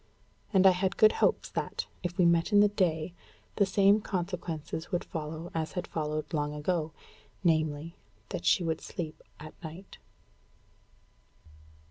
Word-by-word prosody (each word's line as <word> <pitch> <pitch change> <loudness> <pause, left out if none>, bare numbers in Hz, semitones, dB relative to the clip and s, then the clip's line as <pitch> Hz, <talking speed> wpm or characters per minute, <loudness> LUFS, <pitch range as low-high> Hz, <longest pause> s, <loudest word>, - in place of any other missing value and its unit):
And 190 -2 +4
I 190 - +9
had 185 +1 -1
good 215 0 +7
hopes - - +1
that, - - -3 0.2
if 175 0 -4
we 180 - +5
met 170 +3 +3
in 205 - +6
the 210 - +7
day, 170 -4 0 0.4
the 200 - +4
same 200 +2 +4
consequences 170 -4 -4
would 175 - 0
follow 160 +1 -6
as 160 -1 -2
had 180 - -3
followed 155 0 -3
long 150 -1 -1
ago 160 +1 -1 0.5
namely, 155 -1 +1 0.4
that - - -4
she 180 - +4
would 160 -1 -1
sleep 165 -5 -6 0.2
at 155 0 -9
night. 170 +5 -9
170 Hz, 145 wpm, -30 LUFS, 155-185 Hz, 0.5 s, I